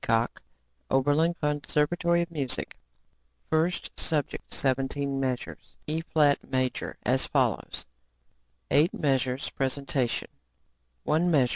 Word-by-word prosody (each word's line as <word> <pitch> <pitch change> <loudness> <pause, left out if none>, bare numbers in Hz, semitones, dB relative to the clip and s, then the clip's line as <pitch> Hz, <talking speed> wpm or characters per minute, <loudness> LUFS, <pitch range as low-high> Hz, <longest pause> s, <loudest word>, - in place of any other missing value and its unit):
HEACOX, 115 +1 +1 0.5
Oberlin 145 +6 +3
Conservatory 150 +3 +1
of 170 - -9
Music 140 -6 -2 0.8
First 160 +3 +1
Subject 150 -4 -2
17 135 +1 0
measures, 130 -2 -4
E[flat] 155 -2 +2
major, 130 -1 -1
as - - +1
follows: - - 0 0.9
8 155 +5 +5
meas. 135 -3 0
presentation, 135 -2 -1 0.7
one 170 +3 +2
meas. 135 -7 +4
145 Hz, 95 wpm, -28 LUFS, 130-160 Hz, 0.9 s, 8